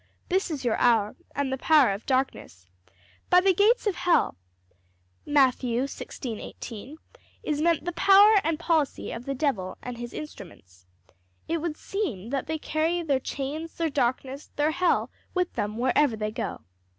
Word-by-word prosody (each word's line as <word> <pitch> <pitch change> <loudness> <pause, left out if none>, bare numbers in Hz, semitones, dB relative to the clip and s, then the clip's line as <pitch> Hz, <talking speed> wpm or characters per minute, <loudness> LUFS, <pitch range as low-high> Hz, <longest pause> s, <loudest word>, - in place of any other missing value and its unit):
'This 380 0 +1
is 290 -5 -4
your 230 - +1
hour 225 -4 +3 0.2
and 275 -2 -1
the 265 - -3
power 295 -8 +5
of 195 +2 -6
darkness.' 255 - -2 0.6
By 360 - +7
the 380 +1 +4
gates 425 +7 +3
of 415 - +2
hell, 350 - +2 0.9
Matt. 275 -4 +4
16:18, 245 0 -5 0.5
is 300 -1 -1
meant 335 -1 +2
the 350 - -1
power 400 +4 +6
and 325 -1 0
policy 320 -4 0
of 235 +2 -7
the 275 - -2
devil 250 -10 -1
and 245 -1 -7
his 240 0 -6
instruments. 90 - -10 0.6
It 335 - -1
would 320 -2 -3
seem 250 - -4
that 275 0 -2
they 315 +1 -1
carry 320 +3 -1
their 280 -5 +1
chains, 290 +5 -5
their 330 -2 -1
darkness, 265 +1 -1
their 295 +1 +2
hell 360 +2 +1 0.2
with 360 -1 0
them 210 +1 -3
wherever 260 +1 +2
they 215 0 -2
go. 230 +1 -4
280 Hz, 160 wpm, -26 LUFS, 240-330 Hz, 0.9 s, By